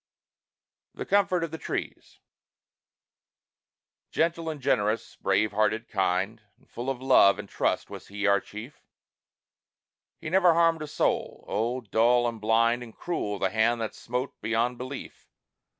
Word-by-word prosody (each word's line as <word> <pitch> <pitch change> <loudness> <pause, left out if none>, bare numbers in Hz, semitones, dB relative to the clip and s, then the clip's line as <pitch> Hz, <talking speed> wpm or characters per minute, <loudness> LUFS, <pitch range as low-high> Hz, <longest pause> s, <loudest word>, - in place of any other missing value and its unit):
THE - - -5
COMFORT 190 -3 +2
OF 165 - -3
THE 160 - -6
TREES - - -6 1.9
Gentle 165 0 0
and 155 -2 -5
generous, 105 -3 0
brave 110 0 +1
hearted, 110 +2 0
kind, 95 +3 0 0.2
And - - -29
full 120 +3 -5
of 130 -1 -4
love 125 -7 +6
and - - -7
trust - - -1
was - - -9
he, 100 0 -4
our 100 -1 +4
chief; 110 +9 -10 1.4
He 160 -1 -7
never 180 -3 +5
harmed 165 -1 +3
a 155 - -4
soul! - - -1
Oh, 120 +4 -1
dull 120 +2 +3
and 115 -2 -5
blind 115 +2 +3
And 115 -2 -11
cruel, 105 -12 -3
the 95 -1 0
hand 115 +2 +2
that 110 - -3
smote, 125 +3 -4
beyond 115 +3 0
belief! 130 +2 -8
120 Hz, 145 wpm, -27 LUFS, 110-145 Hz, 1.9 s, love